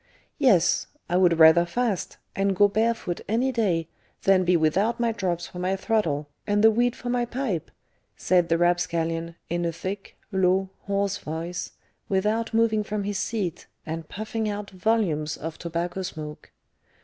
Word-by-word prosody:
"Yes; 200 Hz, -, +4 dB, 0.2 s
I 175 Hz, -, -1 dB
would 180 Hz, -2 st, +4 dB
rather 160 Hz, +1 st, +8 dB
fast, 205 Hz, +2 st, -2 dB, 0.2 s
and 195 Hz, 0 st, +1 dB
go 205 Hz, +2 st, +6 dB
barefoot 220 Hz, -3 st, 0 dB
any 245 Hz, +5 st, +2 dB
day, 185 Hz, -9 st, 0 dB, 0.4 s
than 195 Hz, -1 st, +4 dB
be 180 Hz, 0 st, +3 dB
without 190 Hz, +10 st, +1 dB
my 235 Hz, -1 st, +2 dB
drops 180 Hz, -5 st, -2 dB
for 180 Hz, -, -9 dB
my 185 Hz, +2 st, 0 dB
throttle, 190 Hz, -9 st, 0 dB, 0.2 s
and 205 Hz, 0 st, +2 dB
the 225 Hz, -, +8 dB
weed 240 Hz, +2 st, +1 dB
for 245 Hz, -, -6 dB
my 245 Hz, -1 st, +1 dB
pipe," 235 Hz, -, -3 dB, 0.5 s
said 175 Hz, -2 st, +2 dB
the 165 Hz, -, +3 dB
rapscallion, 170 Hz, -1 st, 0 dB
in 175 Hz, 0 st, -1 dB
a 170 Hz, -, 0 dB
thick, 190 Hz, +4 st, -6 dB
low, 190 Hz, 0 st, +2 dB, 0.2 s
hoarse 200 Hz, 0 st, 0 dB
voice, 165 Hz, +3 st, -5 dB, 0.4 s
without 215 Hz, +4 st, +1 dB
moving 225 Hz, -2 st, +2 dB
from 210 Hz, -1 st, -3 dB
his 205 Hz, 0 st, -2 dB
seat, 205 Hz, -7 st, -3 dB, 0.2 s
and 160 Hz, 0 st, -5 dB
puffing 215 Hz, +1 st, -3 dB
out 205 Hz, -1 st, -5 dB
volumes 185 Hz, -7 st, 0 dB
of 160 Hz, 0 st, -6 dB
tobacco 175 Hz, +2 st, -3 dB
smoke. 155 Hz, -4 st, -7 dB
190 Hz, 160 wpm, -25 LUFS, 170-215 Hz, 0.5 s, rather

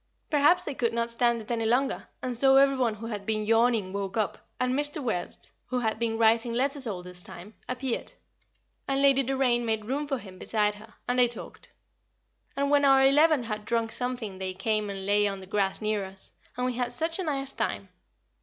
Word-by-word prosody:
Perhaps 305 Hz, +5 st, +4 dB
they 290 Hz, -, -3 dB
could 235 Hz, -3 st, -1 dB
not 235 Hz, 0 st, 0 dB
stand 235 Hz, -1 st, +1 dB
it 225 Hz, -, -8 dB
any 230 Hz, -1 st, 0 dB
longer, 265 Hz, +4 st, 0 dB, 0.2 s
and 250 Hz, -1 st, -2 dB
so 270 Hz, +3 st, +5 dB
every 275 Hz, 0 st, +5 dB
one 240 Hz, -4 st, 0 dB
who 220 Hz, +2 st, -9 dB
had 210 Hz, -3 st, -5 dB
been 215 Hz, 0 st, -1 dB
yawning 225 Hz, -3 st, +2 dB
woke 200 Hz, +1 st, -3 dB
up, 215 Hz, -2 st, -1 dB, 0.2 s
and 255 Hz, 0 st, +1 dB
Mr. 290 Hz, +2 st, -1 dB
Wertz, 220 Hz, -10 st, -4 dB
who 255 Hz, -, -2 dB
had 220 Hz, -3 st, -1 dB
been 225 Hz, -1 st, -1 dB
writing 230 Hz, +1 st, +3 dB
letters 270 Hz, +2 st, 0 dB
all 185 Hz, -5 st, -4 dB
this 180 Hz, 0 st, -7 dB
time, 200 Hz, +4 st, -10 dB, 0.2 s
appeared, 255 Hz, -1 st, -3 dB, 0.7 s
and 275 Hz, 0 st, 0 dB
Lady 275 Hz, -1 st, +5 dB
Doraine 260 Hz, -2 st, +1 dB
made 220 Hz, -2 st, -1 dB
room 280 Hz, +5 st, -2 dB
for 275 Hz, -2 st, -1 dB
him 190 Hz, -5 st, -12 dB
beside 210 Hz, -2 st, 0 dB
her, 215 Hz, +1 st, -15 dB
and 250 Hz, +1 st, +1 dB
they 245 Hz, -, +6 dB
talked; 235 Hz, -, -7 dB, 0.9 s
and 280 Hz, 0 st, +1 dB
when 290 Hz, 0 st, +4 dB
our 270 Hz, -1 st, +6 dB
Eleven 295 Hz, 0 st, +5 dB
had 215 Hz, -2 st, -4 dB
drunk 230 Hz, 0 st, -1 dB
something 230 Hz, -5 st, -3 dB
they 185 Hz, -1 st, -4 dB
came 215 Hz, +1 st, -1 dB
and 195 Hz, -1 st, -5 dB
lay 205 Hz, +1 st, +3 dB
on 195 Hz, -1 st, -3 dB
the 190 Hz, -, -10 dB
grass 195 Hz, +1 st, -1 dB
near 215 Hz, -1 st, 0 dB
us, 190 Hz, 0 st, -7 dB, 0.3 s
and 250 Hz, -, -1 dB
we 255 Hz, -, 0 dB
had 245 Hz, 0 st, -2 dB
such 325 Hz, +7 st, +1 dB
a -, -, -1 dB
nice 275 Hz, -4 st, +1 dB
time. -, -, -3 dB
235 Hz, 210 wpm, -27 LUFS, 210-270 Hz, 0.9 s, they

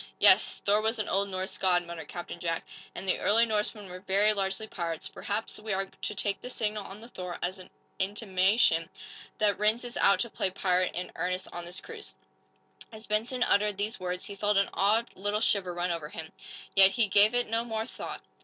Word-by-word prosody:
"Yes; -, -, +5 dB
Thor 205 Hz, +1 st, +4 dB
was 220 Hz, +2 st, 0 dB
an 215 Hz, -, -2 dB
old 200 Hz, +1 st, +1 dB
Norse 185 Hz, 0 st, -4 dB
god," 180 Hz, -2 st, +3 dB
muttered 170 Hz, -3 st, -7 dB
Captain 175 Hz, 0 st, -7 dB
Jack. 165 Hz, -1 st, -2 dB, 0.3 s
"And 195 Hz, -, -6 dB
the 185 Hz, -, +2 dB
early 225 Hz, +3 st, +5 dB
Norsemen 210 Hz, -2 st, -2 dB
were 180 Hz, 0 st, -8 dB
very 200 Hz, +3 st, +3 dB
largely 195 Hz, +1 st, -1 dB
pirates. 170 Hz, -6 st, -4 dB
Perhaps 210 Hz, +2 st, -4 dB
we 215 Hz, -1 st, -3 dB
are 195 Hz, +1 st, 0 dB
to 200 Hz, -, -5 dB
take 200 Hz, 0 st, -1 dB
the 250 Hz, -, -6 dB
signal 215 Hz, -4 st, -2 dB
on 195 Hz, +2 st, -10 dB
the 230 Hz, -, -10 dB
'Thor' 180 Hz, -6 st, -6 dB
as 185 Hz, +2 st, -2 dB
an 185 Hz, -, -12 dB, 0.3 s
intimation 190 Hz, -3 st, +2 dB, 0.5 s
that 205 Hz, -2 st, +2 dB
Rhinds 215 Hz, +4 st, +2 dB
is 240 Hz, -, -7 dB
out 200 Hz, -, +4 dB
to 235 Hz, -, -1 dB
play 190 Hz, -, -1 dB
pirate 185 Hz, -1 st, 0 dB
in 180 Hz, +1 st, -4 dB
earnest 185 Hz, +1 st, -2 dB
on 175 Hz, 0 st, -5 dB
this 175 Hz, +1 st, -4 dB
cruise." 450 Hz, -2 st, -9 dB, 0.8 s
As 220 Hz, 0 st, -10 dB
Benson 230 Hz, +4 st, 0 dB
uttered 205 Hz, -2 st, +2 dB
these 210 Hz, +3 st, -2 dB
words 180 Hz, 0 st, -3 dB
he 200 Hz, -, -7 dB
felt 205 Hz, 0 st, +1 dB
an 195 Hz, -, +2 dB
odd 220 Hz, +4 st, +2 dB
little 205 Hz, +2 st, -1 dB
shiver 200 Hz, -4 st, +1 dB
run 175 Hz, +1 st, -1 dB
over 165 Hz, -3 st, -4 dB
him. 160 Hz, -1 st, -8 dB, 0.4 s
Yet 195 Hz, -1 st, +8 dB
he 230 Hz, -3 st, +3 dB
gave 205 Hz, +4 st, +5 dB
it 245 Hz, -, +2 dB
no 225 Hz, +1 st, 0 dB
more 225 Hz, -2 st, -3 dB
thought. -, -, -7 dB
200 Hz, 210 wpm, -29 LUFS, 185-215 Hz, 0.8 s, Yet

